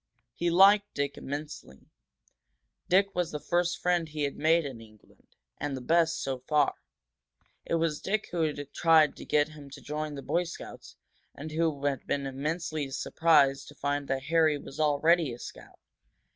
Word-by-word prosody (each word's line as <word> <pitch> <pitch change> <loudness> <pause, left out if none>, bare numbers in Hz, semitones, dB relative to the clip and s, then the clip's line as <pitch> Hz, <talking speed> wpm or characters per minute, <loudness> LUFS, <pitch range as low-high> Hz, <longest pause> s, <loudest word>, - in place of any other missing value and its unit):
He 170 +6 -1
liked 200 +4 +5
Dick 140 0 -2
immensely; 145 - -8 1.0
Dick 195 +2 +3
was 175 -2 -1
the 150 - -5
first 175 +3 0
friend 175 -2 0
he 150 0 -3
had 140 - -2
made 160 +1 +2
in 130 -5 -7
England, 110 -1 -20 0.2
and 145 -2 -3
the - - -5
best, 165 +4 +1
so 135 -1 -3
far. 145 +2 +1 0.9
It - - 0
was 165 -2 0
Dick 210 +2 -2
who 175 -1 -1
had 145 -2 -3
tried 160 -3 +4
to - - -9
get 150 +1 +2
him 150 -2 -12
to 140 - -11
join 150 0 -4
the 140 - -7
Boy 175 +1 0
Scouts, 170 - -10 0.4
and 155 +2 -7
who 155 -3 -1
had 140 -2 -1
been 140 -1 -1
immensely 150 +2 -3
surprised 140 -1 +2
to 145 - -13
find 145 0 -2
that 135 0 -2
Harry 160 -1 +3
was 140 +1 -11
already 155 +1 +3
a - - -8
scout. - - -11
150 Hz, 170 wpm, -29 LUFS, 140-165 Hz, 1.0 s, liked